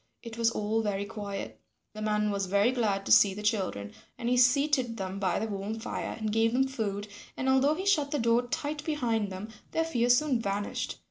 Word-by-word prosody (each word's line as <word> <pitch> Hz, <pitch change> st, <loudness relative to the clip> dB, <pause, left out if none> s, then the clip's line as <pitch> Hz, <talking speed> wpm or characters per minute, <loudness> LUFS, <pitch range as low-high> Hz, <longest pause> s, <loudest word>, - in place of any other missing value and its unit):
It 230 Hz, -2 st, -8 dB
was 230 Hz, 0 st, +2 dB
all 220 Hz, 0 st, -1 dB
very 200 Hz, -2 st, -2 dB
quiet. 200 Hz, -1 st, -6 dB, 0.3 s
The 215 Hz, -, -8 dB
man 210 Hz, 0 st, +1 dB
was 200 Hz, -1 st, -1 dB
very 200 Hz, +5 st, +3 dB
glad 205 Hz, -6 st, 0 dB
to -, -, -3 dB
see 195 Hz, -2 st, +6 dB
the 210 Hz, -, -7 dB
children 190 Hz, -, -1 dB, 0.3 s
and 235 Hz, -, -2 dB
he 250 Hz, -, +3 dB
seated 250 Hz, -1 st, +3 dB
them 190 Hz, -1 st, -4 dB
by 185 Hz, -3 st, +1 dB
the 220 Hz, -, -1 dB
warm 210 Hz, +1 st, -4 dB
fire, 225 Hz, -, -4 dB
and 215 Hz, -2 st, -2 dB
gave 225 Hz, +1 st, +2 dB
them 265 Hz, +2 st, +3 dB
food, 210 Hz, -6 st, -3 dB, 0.3 s
and 260 Hz, -, -2 dB
although 265 Hz, +3 st, +4 dB
he 375 Hz, -, -4 dB
shut 305 Hz, -8 st, +2 dB
the 295 Hz, -, -1 dB
door 235 Hz, 0 st, +2 dB
tight 295 Hz, +4 st, -3 dB
behind 230 Hz, -10 st, -1 dB
them, 190 Hz, +4 st, -6 dB, 0.2 s
their 325 Hz, -, +2 dB
fear 245 Hz, -7 st, 0 dB
soon 250 Hz, -1 st, +3 dB
vanished. 200 Hz, -1 st, -3 dB
225 Hz, 210 wpm, -29 LUFS, 205-255 Hz, 0.3 s, see